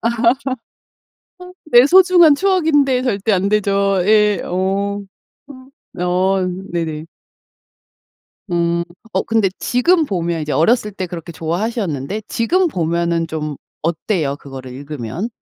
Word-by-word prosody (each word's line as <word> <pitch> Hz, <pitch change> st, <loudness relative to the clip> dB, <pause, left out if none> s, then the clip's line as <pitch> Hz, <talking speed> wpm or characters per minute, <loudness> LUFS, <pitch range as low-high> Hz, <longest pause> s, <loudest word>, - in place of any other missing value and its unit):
어 230 Hz, -, +2 dB, 1.6 s
내 245 Hz, -5 st, +6 dB
소중한 360 Hz, -4 st, +6 dB
추억인데 305 Hz, -8 st, +2 dB
절대 220 Hz, -4 st, -1 dB
안 195 Hz, 0 st, +1 dB
되죠. 200 Hz, -2 st, +1 dB
예. 210 Hz, -2 st, +3 dB
어. 195 Hz, +2 st, -1 dB, 0.5 s
어. 260 Hz, -, -11 dB
어 185 Hz, +1 st, +1 dB, 0.3 s
네네. 160 Hz, -2 st, -3 dB, 1.5 s
음. 170 Hz, 0 st, +1 dB, 0.3 s
어 -, -, +1 dB
근데 225 Hz, -3 st, +1 dB
지금 325 Hz, +7 st, +2 dB
보면 170 Hz, -, -2 dB
이제 150 Hz, -1 st, -3 dB
어렸을 210 Hz, -, +2 dB
때 185 Hz, -1 st, -4 dB
그렇게 170 Hz, -1 st, -8 dB
좋아하셨는데 175 Hz, -, -3 dB
지금 355 Hz, +11 st, +1 dB
보면은 170 Hz, -, -1 dB
좀 150 Hz, -2 st, -4 dB, 0.3 s
어때요 160 Hz, -2 st, -1 dB
그거를 135 Hz, -3 st, -10 dB
읽으면? 140 Hz, -, -5 dB
195 Hz, 225 characters per minute, -18 LUFS, 165-235 Hz, 1.6 s, 내